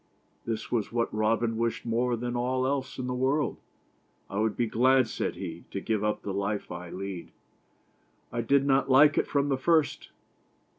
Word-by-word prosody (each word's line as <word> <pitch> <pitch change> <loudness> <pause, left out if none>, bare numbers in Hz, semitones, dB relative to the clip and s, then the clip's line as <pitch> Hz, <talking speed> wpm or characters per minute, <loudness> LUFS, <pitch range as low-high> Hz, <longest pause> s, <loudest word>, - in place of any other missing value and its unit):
This 110 -1 -4
was 115 -4 0
what 115 0 -1
Robin 110 +1 +1
wished 115 +1 -1
more 120 +1 +1
than 120 +1 -3
all 130 +1 0
else 135 0 -2
in 130 - -3
the 125 - -2
world. 135 +4 0 0.4
" - - -40
I 100 - -2
would 110 0 0
be 120 - +2
glad," 130 +2 +3
said - - -3
he, - - -6
" - - -37
to - - -4
give 110 -2 -1
up 105 0 -1
the 100 - -3
life 100 +1 -2
I 90 0 -6
lead. 95 -1 -6 1.0
I 120 - -1
did 140 +4 +3
not 135 0 +2
like 145 +3 +6
it - - 0
from 140 0 +1
the 135 -2 0
first. 160 +1 +1
120 Hz, 195 wpm, -28 LUFS, 110-130 Hz, 1.0 s, like